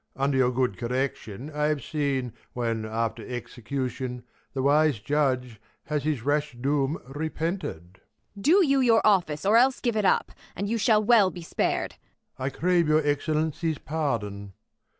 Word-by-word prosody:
Under 135 +1 0
your 130 -1 +4
good 125 -5 -1
correction, 125 0 -3
I 150 0 -1
have 150 -4 -1
seen 140 -5 -1 0.2
When, 115 -2 -2
after 115 +1 -2
execution, 125 0 -4 0.3
the 135 -1 -2
wise 150 -1 +4
judge 125 -3 -1 0.2
Has 150 -1 -2
his 150 -7 -1
rash 145 +1 0
doom 140 +4 0
repented. 150 - -4 0.4
Ang. 200 - -10
Do 360 - +5
j^ou 275 -2 +3
your 230 -2 +4
office, 180 -7 +2
or 210 +3 +5
else 260 +2 +4
give 240 -3 -1
it 215 - +1
up! 190 - +2 0.2
And 200 +3 -3
you 230 +2 -1
shall 215 0 +4
well 215 -4 +5
he 175 -2 -9
spar'd. - - -1 0.4
Prov. 130 - -3
I - - +1
crave 175 +2 +1
your 155 0 +3
Excellency's 155 +2 0
pardon. 105 -12 -3
145 Hz, 160 wpm, -26 LUFS, 125-170 Hz, 0.4 s, Do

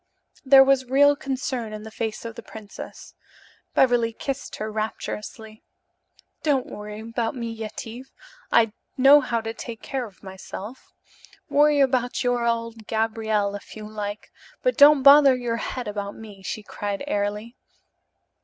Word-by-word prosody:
There 270 -1 +8
was 270 -1 +3
real 285 +2 +5
concern 260 -5 -4
in 215 0 -7
the 220 - -9
face 220 0 -4
of 230 - -5
the 235 - -9
princess. 215 -2 -11 0.6
Beverly 240 -3 +3
kissed 275 +4 -5
her 215 0 -5
rapturously. 215 0 -5 0.8
"Don't 280 -4 +1
worry 210 0 -8
about 230 +2 -3
me, 235 -2 -4
Yetive. 225 +3 -8 0.4
I 225 -2 +4 0.2
know 275 +3 +7
how 235 -3 -1
to 225 0 -5
take 230 0 -8
care 260 -3 -3
of 200 -1 -20
myself. 195 +5 -9 0.6
Worry 295 0 +4
about 255 -2 +1
your 245 -1 +1
old 230 -1 -3
Gabriel, 220 -2 0
if 205 - -9
you 215 -1 -8
like, 210 -1 -6 0.3
but - - +2
don't 285 -1 +7
bother 280 -1 +8
your 240 -2 -2
head 250 0 -4
about 205 -1 -4
me," 210 -3 -12
she 210 +2 -5
cried 205 +2 -4
airily. 210 -1 -2
230 Hz, 145 wpm, -24 LUFS, 215-260 Hz, 0.8 s, There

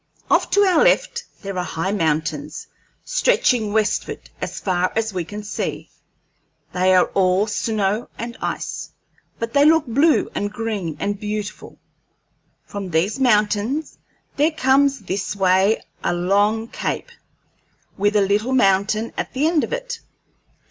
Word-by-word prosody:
Off - - +3
to 405 - +3
our 375 -2 +4
left - - +2 0.2
there 195 -1 -5
are - - -1
high 180 +2 -2
mountains, 155 -5 -1 0.4
stretching 245 - +2
westward 215 0 -1
as - - -4
far 185 -1 0
as 220 -1 -1
we 180 -2 -2
can 210 +5 -8
see. 205 - -4 0.8
They 185 +1 +3
are 180 - +5
all 190 +1 +3
snow 215 0 -1
and 235 0 -5
ice, - - -4 0.5
but 230 0 -4
they 280 - +5
look 320 +1 +5
blue 280 +7 +3
and 205 0 -2
green 210 -8 -3
and 200 0 -2
beautiful. 210 -1 -5 0.9
From 200 -2 -6
these 180 +9 0
mountains 220 +4 +1 0.4
there 295 +3 +4
comes 275 -3 +2
this 195 +1 -3
way 195 +2 +3 0.2
a 175 - +1
long 205 +5 +1
cape, - - -4 0.8
with 205 +2 +1
a 205 - +5
little 205 +6 +1
mountain 205 -1 +2
at - - -4
the 270 +3 +1
end 325 -2 +2
of - - -4
it. - - -4
210 Hz, 140 wpm, -21 LUFS, 195-255 Hz, 0.9 s, are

